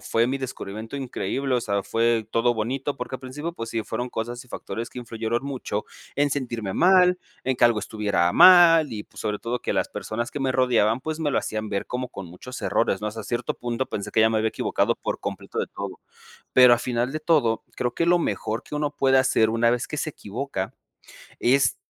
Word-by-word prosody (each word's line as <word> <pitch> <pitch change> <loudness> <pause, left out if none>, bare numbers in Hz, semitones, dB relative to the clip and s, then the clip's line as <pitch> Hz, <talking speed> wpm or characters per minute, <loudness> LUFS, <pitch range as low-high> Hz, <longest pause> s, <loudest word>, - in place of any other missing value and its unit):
fue 115 +1 +1
mi 135 +1 -1
descubrimiento 115 -3 -6
increíble, 135 0 -3
o - - 0
sea, 100 -3 -1
fue 115 +1 +1
todo 120 +1 +2
bonito 130 +6 -2
porque 125 0 -5
al - - -22
principio, 145 +6 -5
pues 115 -9 -6
sí, 115 -1 -1
fueron 120 +3 -4
cosas 120 +1 -5
y - - -21
factores 115 0 -5
que 125 - -8
influyeron 115 0 -3
mucho 130 -6 -3 0.3
en 145 +1 +2
sentirme 120 -8 -3
mal, 180 0 +5 0.2
en 130 0 0
que - - +4
algo 120 -3 +4
estuviera 100 -6 0
mal, 165 -6 +8
y 105 -2 -4
pues, - - -13
sobre 105 -1 -2
todo 120 +1 -2
que - - -2
las - - 0
personas 120 +2 -4
que - - -5
me 135 -1 0
rodeaban, 120 -3 +2
pues 155 +3 -4
me 150 -3 -1
lo - - +2
hacían 110 0 -3
ver 100 0 -2
como 125 0 -3
con 95 - -8
muchos 90 +9 -9
errores, 95 -4 +1
¿no? 105 - -2
Hasta 110 0 -7
cierto 120 +2 -2
punto, 120 +2 -3
pensé 100 -5 -5
que - - +3
ya 110 0 +5
me 110 - +1
había 110 +1 +1
equivocado - - 0
por - - -4
completo - - -6
de - - 0
todo. - - -7 0.5
Pero 125 -1 +8
a 120 - +1
final 120 +1 -1
de 155 - -3
todo, 150 -8 +2
creo 120 -1 -1
que 170 - 0
lo 175 +1 +5
mejor 115 -7 -2
que - - -12
uno 150 0 0
puede 135 -1 +3
hacer 115 -4 +3
una 115 +1 +3
vez 120 +1 0
que 150 - -5
se 155 - -1
equivoca, 105 -6 -5 0.7
es, 135 +3 +3
120 Hz, 220 wpm, -24 LUFS, 110-135 Hz, 0.7 s, mal